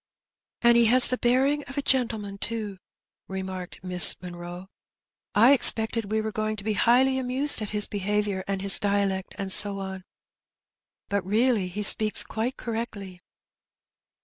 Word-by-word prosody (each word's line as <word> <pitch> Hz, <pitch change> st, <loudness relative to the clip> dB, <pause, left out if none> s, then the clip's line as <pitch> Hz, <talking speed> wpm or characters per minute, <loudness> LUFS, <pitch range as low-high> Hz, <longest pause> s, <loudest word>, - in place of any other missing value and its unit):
"And 235 Hz, 0 st, +5 dB
he 235 Hz, -, +4 dB
has 250 Hz, +2 st, +7 dB
the 255 Hz, -, -1 dB
bearing 270 Hz, +4 st, +1 dB
of 275 Hz, -, -10 dB
a 285 Hz, -, -2 dB
gentleman 220 Hz, -7 st, -2 dB
too/* 215 Hz, -4 st, -5 dB, 0.5 s
re 190 Hz, 0 st, -6 dB
marked 185 Hz, -1 st, -9 dB
Miss 180 Hz, -2 st, +3 dB
Munroe. 175 Hz, +1 st, -10 dB, 0.7 s
"I 235 Hz, +6 st, +6 dB
expected 225 Hz, -4 st, +3 dB
we 220 Hz, 0 st, 0 dB
were 220 Hz, 0 st, -5 dB
going 215 Hz, 0 st, -3 dB
to 200 Hz, -, -10 dB
be 215 Hz, +1 st, -2 dB
highly 260 Hz, +5 st, +2 dB
amused 260 Hz, +1 st, -2 dB
at 210 Hz, -, -5 dB
his 210 Hz, -1 st, +3 dB
behaviour 205 Hz, -1 st, -3 dB
and 195 Hz, -1 st, -4 dB
his 195 Hz, -1 st, +5 dB
dialect, 200 Hz, -2 st, -2 dB
and 195 Hz, -1 st, -4 dB
so 200 Hz, +1 st, +2 dB
on; 190 Hz, -1 st, -7 dB, 1.0 s
but 200 Hz, -2 st, -2 dB
really 215 Hz, +1 st, 0 dB
he 200 Hz, +4 st, -6 dB
speaks 215 Hz, +1 st, +3 dB
quite 230 Hz, +4 st, -5 dB
correctly." 220 Hz, -6 st, -7 dB
210 Hz, 155 wpm, -25 LUFS, 195-235 Hz, 1.0 s, has